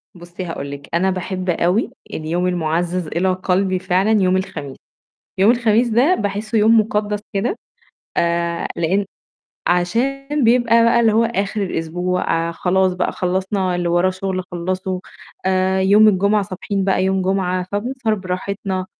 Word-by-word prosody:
بُصّي 175 Hz, +1 st, -8 dB
هاقول 145 Hz, -4 st, -5 dB
لِك، 140 Hz, 0 st, -9 dB
أنا 180 Hz, +3 st, +2 dB
باحب 185 Hz, 0 st, -4 dB
أوي 180 Hz, +7 st, +1 dB, 0.2 s
اليوم 170 Hz, +3 st, -1 dB
المُعزَّز 175 Hz, 0 st, -1 dB
إلى 185 Hz, +4 st, 0 dB
قَلبي 185 Hz, 0 st, 0 dB
فعلًا 185 Hz, +3 st, +1 dB
يوم 185 Hz, 0 st, +3 dB
الخميس، 150 Hz, -7 st, -5 dB, 0.6 s
يوم 200 Hz, +4 st, +5 dB
الخميس 235 Hz, 0 st, +2 dB
ده 250 Hz, +11 st, +3 dB
باحسّه 210 Hz, -, -2 dB
يوم 220 Hz, +2 st, +5 dB
مُقدّس 210 Hz, -1 st, -1 dB
كده، 205 Hz, -, -1 dB, 0.6 s
آآ، 170 Hz, 0 st, 0 dB
لإن 190 Hz, +5 st, 0 dB, 0.6 s
عشان 275 Hz, +11 st, 0 dB
بيبقى 230 Hz, -1 st, +4 dB
بقى 235 Hz, 0 st, +4 dB
اللي 225 Hz, -2 st, +4 dB
هو 225 Hz, +2 st, +3 dB
آخِر 210 Hz, -2 st, -1 dB
الأسبوع 175 Hz, -1 st, -1 dB
آآ، 170 Hz, -, -4 dB
خلاص 185 Hz, +2 st, +1 dB
بقى 180 Hz, 0 st, -1 dB
خلّصنا 185 Hz, +1 st, -1 dB
اللي 175 Hz, -1 st, -1 dB
وراه 175 Hz, +2 st, +2 dB
شُغل 185 Hz, 0 st, -3 dB
خلّصه 185 Hz, +1 st, -3 dB, 0.5 s
آآ، 190 Hz, 0 st, +2 dB
يوم 205 Hz, +3 st, +6 dB
الجمعة 200 Hz, +1 st, +2 dB
صابحين 195 Hz, 0 st, -3 dB
بقى 190 Hz, -1 st, +1 dB
يوم 190 Hz, 0 st, +1 dB
جمعة، 185 Hz, -1 st, 0 dB
فبنسهر 230 Hz, +2 st, -1 dB
براحتنا 185 Hz, 0 st, -4 dB
190 Hz, 145 wpm, -19 LUFS, 180-210 Hz, 0.6 s, يوم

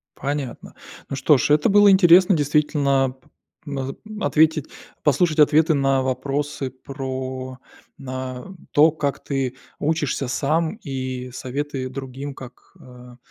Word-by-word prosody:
Понятно. 140 Hz, -3 st, -5 dB, 0.3 s
Ну -, -, -3 dB
что 140 Hz, +2 st, +4 dB
ж, -, -, 0 dB
это 150 Hz, 0 st, +4 dB
было 205 Hz, 0 st, +6 dB
интересно, 185 Hz, 0 st, +6 dB
действительно, 145 Hz, -3 st, +1 dB
п 125 Hz, -, -28 dB, 0.4 s
наз 135 Hz, -2 st, -4 dB, 0.2 s
ответить 160 Hz, -6 st, +2 dB, 0.4 s
послушать 155 Hz, +2 st, +2 dB
ответы 155 Hz, +2 st, +5 dB
на 135 Hz, -2 st, +2 dB
вопросы 135 Hz, +1 st, -2 dB
про, 130 Hz, -1 st, -6 dB, 0.5 s
а, 130 Hz, -1 st, -5 dB, 0.3 s
то, 155 Hz, +2 st, +5 dB
как 145 Hz, -2 st, -3 dB
ты 135 Hz, -3 st, -2 dB, 0.2 s
учишься 150 Hz, -3 st, -1 dB
сам, 155 Hz, -, 0 dB
и 130 Hz, -3 st, -5 dB
советы 130 Hz, +1 st, -4 dB
другим, 135 Hz, +1 st, -7 dB
как, 125 Hz, -1 st, -13 dB
а, 125 Hz, -1 st, -14 dB
140 Hz, 120 wpm, -22 LUFS, 130-150 Hz, 0.5 s, было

